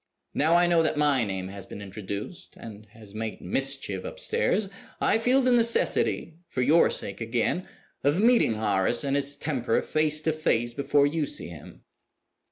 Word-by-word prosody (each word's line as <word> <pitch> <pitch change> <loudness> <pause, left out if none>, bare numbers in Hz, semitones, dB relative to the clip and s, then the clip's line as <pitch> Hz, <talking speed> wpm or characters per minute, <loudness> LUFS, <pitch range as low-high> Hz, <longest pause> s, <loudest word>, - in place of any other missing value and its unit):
Now 160 +3 +2
I 175 0 +5
know 170 -1 +3
that 155 -2 0
my 145 -4 +3
name 95 -3 -4
has 95 -1 -10
been - - -9
introduced, 100 - -7
and 110 -1 -11
has 105 -1 -15
made 110 0 -5
mischief 135 +8 -1
upstairs, 475 - -1 0.3
I 220 - +2
feel 255 +4 +2
the 255 - +3
necessity 230 -8 +1
(for 125 - -2
your 165 +6 +4
sake 100 - -4
again) 120 +10 -1 0.4
of 145 +5 +2
meeting 230 - +4
Horace 105 +2 +1
and 140 0 0
his 140 0 +1
temper 130 -7 -1
face 155 0 +1
to 160 - +1
face 120 -7 0
before 140 +2 +2
you 150 0 -1
see - - -4
him. 85 -4 -13
140 Hz, 170 wpm, -26 LUFS, 110-165 Hz, 0.4 s, I